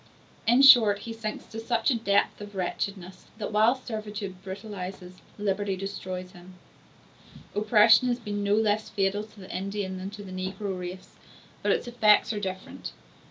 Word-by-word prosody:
In 245 +4 +5
short, 220 -7 +8
he 230 - -5
sinks 225 -1 -5
to 225 - -6
such 230 +3 +1
a - - +2
depth 205 -3 +1
of 205 0 -9
wretchedness, 185 0 -4
that 215 -1 -4
while 220 +4 +4
servitude 210 -6 -6
brutalizes, 190 -2 -8 0.2
liberty 205 -1 -1
destroys 185 -1 -6
him. 180 +1 -14 1.0
Oppression 215 +3 +5
has 240 -1 +1
been 205 -3 -4
no 200 0 +3
less 215 0 +1
fatal 195 +1 0
to 215 -1 -15
the 185 -2 -8
Indian 190 0 -3
than 190 +1 -5
to 205 0 -9
the 190 - -10
negro 190 +2 -4
race, 180 +1 -8 0.4
but - - +1
its - - 0
effects 220 -2 +4
are 210 - -3
different. 190 -2 -6
205 Hz, 160 wpm, -27 LUFS, 190-220 Hz, 1.0 s, short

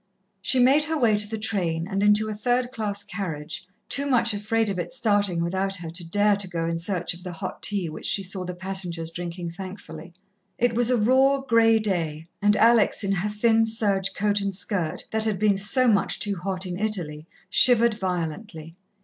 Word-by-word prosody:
She 260 - +1
made 270 +4 +4
her 320 +1 -2
way 235 -6 +3
to 210 0 -1
the 220 - -3
train 175 -6 -2
and 195 0 -2
into 210 +1 +3
a 215 - -3
third 245 +4 0
class 205 -4 -2
carriage, 165 -5 -6 0.2
too 280 +1 -1
much 235 -4 +2
afraid 215 +2 0
of 185 - -4
its 175 +8 -3
starting 205 -8 +1
without 190 +3 -1
her 170 -3 -7
to 175 +1 -5
dare 205 +3 +3
to 200 -1 -4
go 170 -2 -3
in 165 0 -2
search 180 0 -1
of 175 - -12
the 180 -1 -7
hot 185 +3 -6
tea 200 -4 -1
which 155 - -5
she 195 - +3
saw 185 0 -4
the 180 0 -6
passengers 180 -3 -3
drinking 175 0 -5
thankfully. 175 -3 -9 0.4
It 245 0 +1
was 240 +1 +2
a 250 - +3
raw, 265 +5 +3
grey 230 -3 +4
day, 165 -7 -2 0.2
and 205 0 +4
Alex, 225 -1 +4
in 195 - -1
her 195 +2 -1
thin 225 +2 +2
serge 200 -4 0
coat 205 0 0
and 200 -1 -2
skirt, 185 -5 -2
that 220 0 0
had 215 -3 0
been 210 0 +2
so 230 +7 +2
much 205 -4 +2
too 205 -1 -1
hot 185 +1 -4
in 180 0 -5
Italy, 170 -8 -3 0.2
shivered 235 -2 +5
violently. 175 -3 -5
200 Hz, 200 wpm, -24 LUFS, 175-220 Hz, 0.4 s, shivered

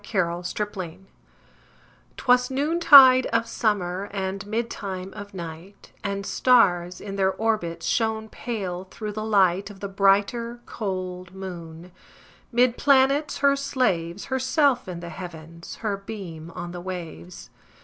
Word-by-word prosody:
1827 185 +1 -2
Evening 190 +3 -21
Star - - -32 1.0
'Twas 250 +1 +3
noontide 275 -3 +7
of 230 0 +1
summer, 200 -4 -1
And 195 -1 -3
midtime 200 -4 -4
of 200 -1 -9
night, 170 +3 -9
And 200 0 -3
stars, 180 -10 +3
in 200 -1 -6
their 190 -1 +2
orbits, 185 -6 -2
Shone 220 -1 0
pale, 190 -6 -5
through 210 +3 -6
the 215 +1 -5
light 195 -2 +2
Of 200 -2 -12
the 200 - -4
brighter, 205 +5 +1
cold 185 -3 -5
moon. 175 -2 -8 0.6
'Mid 245 0 +2
planets 280 +1 +3
her 280 0 +5
slaves, 200 -11 -1
Herself 265 0 +1
in 175 -2 -6
the 170 - -7
Heavens, 170 -2 -9
Her 205 -2 0
beam 185 -6 -8
on 175 0 -6
the 175 0 -7
waves. 180 -1 -8
195 Hz, 130 wpm, -25 LUFS, 180-230 Hz, 1.0 s, noontide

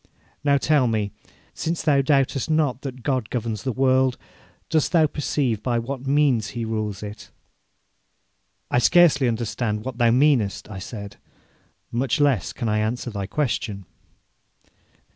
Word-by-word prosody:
Now, 140 -1 +4
tell 140 -2 +2
me, 105 -3 -1 0.4
since 165 0 -3
thou 145 -3 +4
doubtest 135 0 +1
not 150 -5 +1
that 130 -3 -7
God 130 -5 -1
governs 115 -3 -3
the 130 - -2
world, 130 0 +2 0.5
dost 155 -2 +1
thou 165 -2 +5
perceive 140 -7 -1
by 120 +1 0
what 130 +3 -4
means 135 -6 +2
He 115 - -2
rules 110 -3 -3
it?' 105 0 -8 1.4
'I 120 - +3
scarcely 150 -1 +5
understand 110 -2 -2
what 130 -2 -5
thou 120 -1 +4
meanest,' 125 -5 +2
I 95 - -6
said, 100 0 -8 0.7
'much 125 +2 0
less 140 -10 +2
can 120 - -4
I 105 0 +1
answer 120 +3 -2
thy 100 -2 -4
question.' 110 -7 -2
125 Hz, 145 wpm, -23 LUFS, 110-140 Hz, 1.4 s, thou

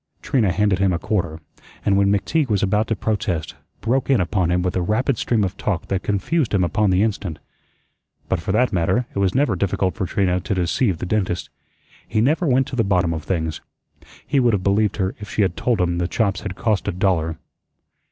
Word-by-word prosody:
Trina 110 -8 +2
handed 100 0 +1
him 100 -1 +3
a 85 - +1
quarter; 85 -5 -2 0.5
and 100 - +3
when 100 0 +3
McTeague 135 - +1
was 100 -3 +1
about 105 +3 +1
to 110 - 0
protest, 100 -5 -2 0.3
broke 130 +4 0
in 135 - +4
upon 90 0 0
him 90 0 +1
with 90 0 -1
a 90 - +1
rapid 110 +8 +1
stream 115 -3 +1
of 95 0 -2
talk 95 -4 -2
that 95 -1 0
confused 105 - 0
him 95 - +3
upon 100 +4 +1
the 95 +2 +3
instant. 100 -7 -2 0.9
But 95 - 0
for 90 - -3
that 120 +3 +2
matter, 95 +8 +1
it - - -3
was 95 -2 +1
never 130 -7 +2
difficult 95 0 0
for 95 -5 -3
Trina 90 0 +1
to 95 +2 -2
deceive 90 +2 +1
the 90 - -4
dentist. 90 -2 -1 0.6
He - - 0
never 155 +9 +2
went 130 0 +3
to - - -5
the 115 - +2
bottom 90 -4 +1
of 80 - -4
things. 80 -2 -2 0.6
He 140 - +1
would 120 -3 +3
have 95 -3 0
believed 100 +1 +2
her 95 -2 0
if 105 -1 -8
she 105 - +1
had 90 -3 0
told 115 +5 0
him 85 -1 +1
the 90 - 0
chops 100 -2 0
had 95 -2 -5
cost 110 -2 0
a - - +1
dollar. 85 -4 0
100 Hz, 220 wpm, -21 LUFS, 90-110 Hz, 0.9 s, in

